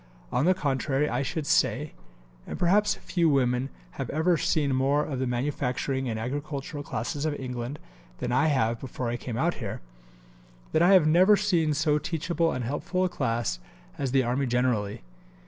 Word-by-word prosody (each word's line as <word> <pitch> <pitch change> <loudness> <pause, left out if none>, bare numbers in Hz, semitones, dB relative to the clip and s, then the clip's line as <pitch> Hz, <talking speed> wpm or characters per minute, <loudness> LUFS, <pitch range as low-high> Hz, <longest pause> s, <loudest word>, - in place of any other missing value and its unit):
On 130 - +1
the 185 +1 +4
contrary 140 -3 0
I 125 -1 -1
should 145 +3 -3
say - - +1 0.5
(and - - -5
perhaps 205 +4 +3
few 170 -3 0
women 130 -2 +1 0.3
have - - -4
ever 165 +4 +2
seen 155 -4 +1
more 140 +3 +2
of 135 -4 -4
the 130 - 0
manufacturing 130 +1 -1
and 110 -1 -3
agricultural 145 +4 -4
classes 145 0 -4
of 155 -2 -1
England 125 +1 -4 0.4
than - - -3
I 130 +5 +3
have 115 -6 +1
before 125 -2 -4
I 120 - -1
came 120 -1 -5
out 170 +7 +1
here) 100 -3 -4 0.9
that 155 - +2
I 180 +3 +6
have 180 -5 +6
never 185 +6 +6
seen 170 -8 +1
so 150 0 +2
teachable 165 +1 -1
and 130 - -3
helpful 175 +8 -1
a 185 - +1
class 115 - -1 0.4
as 135 -2 -1
the 135 0 +3
Army 130 +3 0
generally. 120 - 0
140 Hz, 175 wpm, -27 LUFS, 125-160 Hz, 0.9 s, I